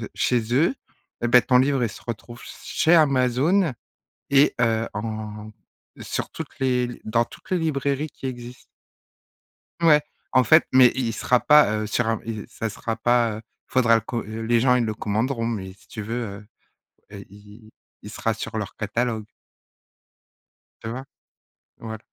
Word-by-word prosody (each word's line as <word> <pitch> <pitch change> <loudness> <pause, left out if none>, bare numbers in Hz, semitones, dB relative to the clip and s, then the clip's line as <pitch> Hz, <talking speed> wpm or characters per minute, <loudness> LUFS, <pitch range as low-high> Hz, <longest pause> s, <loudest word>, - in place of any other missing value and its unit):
je - - -5
chez 120 -2 0
eux, 165 - +3 0.5
eh 120 - +1
bah, 125 +1 +7
ton 125 +1 +3
livre, 135 -1 +2
il - - 0
se - - -12
retrouve 120 +1 -7
s - - -12
chez 175 +1 +2
Amazon 140 +4 +3 0.6
et 140 +1 +4
heu, 115 -1 +1
en 110 0 -6 0.5
sur - - -4
toutes - - -8
les 125 -2 +1
l 120 - -8
dans 115 +2 +1
toutes - - -16
les 185 - +3
librairies 140 -1 -1
qui - - -11
existent. 125 -1 -7 1.2
Ouais, 150 -3 +5 0.3
en 130 - +5
fait, 155 +8 +6
mais 130 -2 +7
il 125 -3 -1
sera 125 +3 +2
pas, 150 -2 +5
heu, - - -3
sur 110 +2 0
un 115 -1 0
il 110 -2 -4
s - - -10
ça 115 - -4
sera 115 +1 -4
pas 115 -2 +1
il 115 - -29
faudra 120 -3 +4
le 115 - +2
co 115 0 -4
les 115 +2 -1
gens, 125 0 +4
ils 125 -2 +2
le 110 - -1
commanderont, 115 +4 -1
mais 95 -5 -4
si 100 - -24
tu 110 - -6
veux, 115 +3 -3 0.2
heu 105 - -17 0.7
heu, 100 -1 -8
il 105 +2 -16 0.3
il 105 - -10
sera 115 +1 -1
sur 110 +1 -6
leur 105 -3 -5
catalogue 110 +1 -2 1.6
tu 110 - -6
vois? 130 +3 -6 0.7
Voilà. 110 -1 -7
120 Hz, 175 wpm, -23 LUFS, 110-130 Hz, 1.6 s, bah